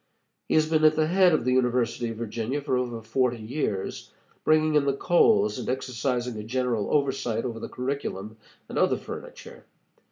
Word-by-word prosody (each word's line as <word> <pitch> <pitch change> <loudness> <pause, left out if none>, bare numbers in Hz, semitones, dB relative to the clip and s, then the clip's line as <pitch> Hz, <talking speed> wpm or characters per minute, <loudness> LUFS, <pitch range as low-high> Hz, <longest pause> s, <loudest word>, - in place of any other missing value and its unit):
He - - +2
has 155 0 +4
been 155 -1 +1
at 155 0 +6
the 155 0 +2
head 180 +2 +4
of 155 -7 +1
the 125 - +2
University 125 -2 +1
of 115 - -6
Virginia 115 +4 -3
for 140 -2 -1
over 120 -3 -2
forty 120 +2 0
years, 110 -3 -4 0.3
bringing 155 0 +3
in 150 -2 +3
the 140 -1 0
coals 175 - +3
and 125 - -4
exercising 125 -2 -2
a 105 - -5
general 120 -2 -1
oversight 130 -5 0
over 115 -2 -4
the - - -6
curriculum 125 -6 -4 0.3
and - - -3
other - - +3
furniture. - - -10
125 Hz, 180 wpm, -26 LUFS, 115-145 Hz, 0.3 s, at